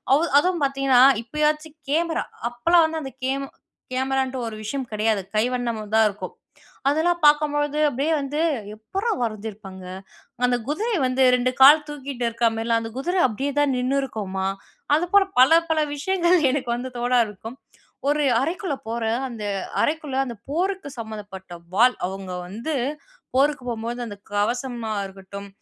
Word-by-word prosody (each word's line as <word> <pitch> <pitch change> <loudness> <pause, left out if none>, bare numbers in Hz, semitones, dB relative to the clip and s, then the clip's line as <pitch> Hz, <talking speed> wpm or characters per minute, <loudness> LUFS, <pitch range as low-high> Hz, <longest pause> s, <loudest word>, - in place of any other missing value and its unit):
அவு 305 - +2 0.2
அதுவும் 350 -1 0
பார்த்தீங்கன்னா 270 -2 +3 0.2
இப்பயாச்சும் 300 +3 -1
கேமரா, 330 +2 0 0.3
அப்பெல்லாம் 335 +8 +4
வந்து 320 0 -4
அந்த 270 - -7
கேம் 275 +1 -1 0.5
கேமரான்ட்டு 265 -1 -1
ஒரு 220 - -6
விஷயம் 260 +3 -4
கிடையாது. 215 -1 +1
கைவண்ணமா 235 -1 0
தான் 220 - +6
இருக்கும். 200 - -7 0.6
அதெல்லாம் 340 +4 +1
பார்க்கம்பொழுது 295 0 +3
அப்பிடியே 285 +4 0
வந்து, 285 +2 -3 0.4
"எப்புட்றா 385 - -3
வரஞ்சிருப்பாங்க! 210 -4 -5 0.6
அந்த 245 0 +2
குதிரை 435 +10 -1
வந்து 255 +1 +2
2 250 0 +1
கால் 295 +3 +9
தூக்கிட்டு 275 -4 -6
இருக்கிறமாரில்லாம். 230 0 +1
அந்த 225 - -6
குதிர 350 +8 -2
அப்பிடியே 270 +6 -3
தான் 285 -2 +2
நின்னுருக்கும்மா!" 225 -8 -2 0.5
அது 335 +3 +1
போல 405 -1 +7 0.2
பல 325 +6 +7
பல 320 -1 +2 0.2
விஷயங்கள் 355 +3 +2
எனக்கு 265 -3 -2
வந்து 255 +2 -5
தோண 245 +1 -2
ஆரம்பிக்கும். 225 +3 -5 0.5
ஒரு 295 0 +2 0.2
அறைக்குள்ள 330 +1 -2
போறேன், 230 0 -1
அந்த 230 -4 -7 0.4
அறைக்குள்ள 295 -3 -1
அந்த 235 -3 -6
போருக்கு 365 0 -1
சம்மந்தப்பட்ட 205 -5 -8 0.2
வாள். 245 +4 +5
அவுங்க 190 -1 -7
வந்து 230 - -4 0.6
போருக்கு 280 -1 +2
போம்போது, 235 +1 -4
அந்த 205 -1 -9 0.2
கவசமா 235 +1 -1
இருக்கட்டும், 195 +1 -10
260 Hz, 140 wpm, -23 LUFS, 225-300 Hz, 0.6 s, கால்